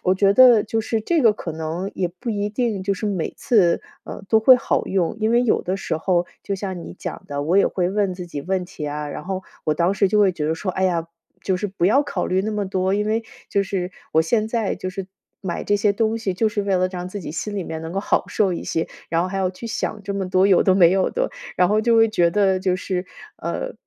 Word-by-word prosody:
我 185 Hz, +1 st, +3 dB
觉 195 Hz, +1 st, +4 dB
得 245 Hz, -3 st, +7 dB
就 225 Hz, +1 st, -1 dB
是 220 Hz, 0 st, -2 dB
这 335 Hz, +5 st, +1 dB
个 225 Hz, -4 st, +5 dB
可 165 Hz, -6 st, -6 dB
能 160 Hz, +5 st, -4 dB
也 180 Hz, -2 st, -1 dB
不 185 Hz, +7 st, -6 dB
一 205 Hz, -1 st, -1 dB
定 215 Hz, -3 st, -1 dB
就 200 Hz, +1 st, 0 dB
是 205 Hz, -, -6 dB
每 190 Hz, -6 st, -2 dB
次， 190 Hz, -8 st, +3 dB, 0.2 s
呃， -, -, -8 dB
都 220 Hz, -1 st, +5 dB
会 255 Hz, +3 st, +8 dB
好 -, -, -1 dB
用， 185 Hz, -2 st, 0 dB
因 220 Hz, +1 st, +2 dB
为 240 Hz, +1 st, +4 dB
有 240 Hz, -, +2 dB
的 185 Hz, +2 st, -2 dB
时 160 Hz, -4 st, -3 dB
候 175 Hz, 0 st, +1 dB, 0.2 s
就 200 Hz, -, -3 dB
像 190 Hz, -2 st, -5 dB
你 -, -, -9 dB
讲 -, -, -6 dB
的， 145 Hz, 0 st, -3 dB
我 175 Hz, +6 st, +2 dB
也 -, -, +5 dB
会 180 Hz, -1 st, -1 dB
问 200 Hz, -2 st, 0 dB
自 180 Hz, -1 st, -7 dB
己 145 Hz, -4 st, -6 dB
问 185 Hz, +3 st, -1 dB
题 165 Hz, -5 st, -7 dB
啊， 150 Hz, 0 st, -4 dB
然 150 Hz, -, -7 dB
后 190 Hz, 0 st, -3 dB, 0.2 s
我 155 Hz, -, +1 dB
当 170 Hz, +4 st, +2 dB
时 200 Hz, -1 st, +2 dB
就 210 Hz, -, +2 dB
会 195 Hz, -3 st, +4 dB
觉 150 Hz, -3 st, -3 dB
得 160 Hz, -, +1 dB
说： 185 Hz, +3 st, -3 dB
“哎 190 Hz, -, 0 dB
呀， 170 Hz, -3 st, 0 dB, 0.4 s
就 190 Hz, -, 0 dB
是 205 Hz, -, -2 dB
不 190 Hz, -3 st, -3 dB
要 265 Hz, +10 st, +4 dB
考 -, -, -3 dB
虑 185 Hz, +1 st, +1 dB
那 215 Hz, -, -2 dB
么 210 Hz, -2 st, -2 dB
多。” 190 Hz, 0 st, 0 dB
因 210 Hz, 0 st, 0 dB
为 225 Hz, +1 st, 0 dB, 0.3 s
就 200 Hz, -, +2 dB
是 185 Hz, -2 st, -3 dB, 0.2 s
我 160 Hz, -, +4 dB
现 215 Hz, +6 st, +1 dB
在 225 Hz, -3 st, -1 dB
就 185 Hz, -, -5 dB
是， 185 Hz, 0 st, -6 dB, 0.4 s
买 180 Hz, -3 st, -3 dB
这 205 Hz, -, +1 dB
些 205 Hz, 0 st, +2 dB
东 225 Hz, +1 st, 0 dB
西 195 Hz, -5 st, -2 dB
就 220 Hz, +3 st, +2 dB
是 210 Hz, -1 st, -2 dB
为 200 Hz, -1 st, 0 dB
了 185 Hz, 0 st, +2 dB
让 180 Hz, -1 st, -6 dB
自 205 Hz, +1 st, -6 dB
己 160 Hz, -, -6 dB
心 205 Hz, +6 st, -4 dB
里 195 Hz, -, -2 dB
面 160 Hz, -1 st, -5 dB
能 165 Hz, +1 st, -6 dB
够 195 Hz, -, -1 dB
好 -, -, +1 dB
受 195 Hz, -4 st, +1 dB
一 -, -, -4 dB
些， 165 Hz, -, -2 dB, 0.2 s
然 165 Hz, +1 st, +1 dB
后 185 Hz, -, -2 dB
还 195 Hz, -, -4 dB
要 190 Hz, -1 st, +1 dB
去 190 Hz, +5 st, -12 dB
想 215 Hz, -1 st, -3 dB
这 200 Hz, 0 st, -4 dB
么 195 Hz, -2 st, -3 dB
多 185 Hz, +1 st, +3 dB
有 190 Hz, -3 st, +5 dB
的 190 Hz, -, +4 dB
没 175 Hz, -3 st, +6 dB
有 190 Hz, 0 st, +2 dB
的， -, -, -1 dB, 0.3 s
然 180 Hz, -, +4 dB
后 215 Hz, +1 st, +3 dB
就 230 Hz, +1 st, +2 dB
会 225 Hz, 0 st, +5 dB
觉 175 Hz, -5 st, +2 dB
得 190 Hz, -1 st, +2 dB
就 185 Hz, -1 st, 0 dB
是， 185 Hz, 0 st, -3 dB, 0.3 s
呃， -, -, -4 dB
190 Hz, 290 characters per minute, -22 LUFS, 180-210 Hz, 0.4 s, 会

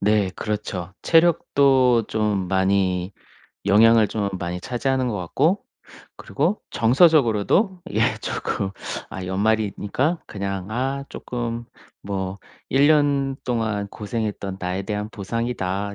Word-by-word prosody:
네 105 Hz, -2 st, +2 dB
그렇죠. 100 Hz, -4 st, -4 dB
체력도 140 Hz, -7 st, +4 dB
좀 105 Hz, -4 st, 0 dB
많이 95 Hz, -1 st, +1 dB, 0.5 s
영향을 110 Hz, +1 st, +6 dB
좀 105 Hz, -2 st, -1 dB
많이 90 Hz, +1 st, -4 dB
차지하는 130 Hz, +3 st, -1 dB
것 105 Hz, -, -2 dB
같고 145 Hz, -, +1 dB, 0.5 s
그리고 170 Hz, +9 st, -1 dB
정서적으로도 150 Hz, -, +3 dB
이게 -, -, 0 dB, 0.2 s
쪼끔 95 Hz, -, -2 dB, 0.4 s
아 95 Hz, -, -6 dB
연말이니까 110 Hz, -, 0 dB
그냥 100 Hz, -1 st, -4 dB
아 135 Hz, +4 st, -2 dB
쪼끔 120 Hz, -1 st, -4 dB, 0.4 s
뭐 95 Hz, -1 st, -4 dB, 0.3 s
'1 140 Hz, +3 st, +4 dB
년 140 Hz, -3 st, +2 dB
동안 110 Hz, -4 st, -1 dB
고생했던 105 Hz, -2 st, -4 dB
나에 90 Hz, +2 st, -2 dB
대한 105 Hz, +1 st, -3 dB
보상이다.' 100 Hz, -2 st, -3 dB
110 Hz, 235 characters per minute, -23 LUFS, 100-130 Hz, 0.5 s, 영향을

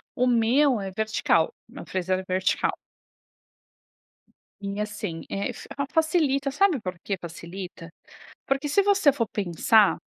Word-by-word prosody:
O 250 Hz, -, +2 dB
meu 245 Hz, +2 st, +3 dB
é 190 Hz, -1 st, -5 dB
vertical. 210 Hz, -5 st, +1 dB
Meu 255 Hz, +5 st, -10 dB
freezer 185 Hz, 0 st, -1 dB
é 190 Hz, -, -6 dB
vertical. 185 Hz, 0 st, 0 dB, 1.9 s
E 200 Hz, +1 st, -4 dB
assim 205 Hz, -5 st, -4 dB
é 200 Hz, +1 st, -2 dB
fa 280 Hz, 0 st, -5 dB
facilita, 305 Hz, -4 st, +2 dB
sabe 345 Hz, -1 st, +2 dB
por 185 Hz, -3 st, -5 dB
que 200 Hz, -, -1 dB
facilita? 170 Hz, 0 st, -9 dB, 0.6 s
Porque 275 Hz, +2 st, 0 dB
se 400 Hz, +8 st, +4 dB
você 390 Hz, -7 st, +4 dB
for 235 Hz, -4 st, -1 dB
pensar 205 Hz, +2 st, +3 dB
220 Hz, 130 wpm, -25 LUFS, 185-275 Hz, 1.9 s, se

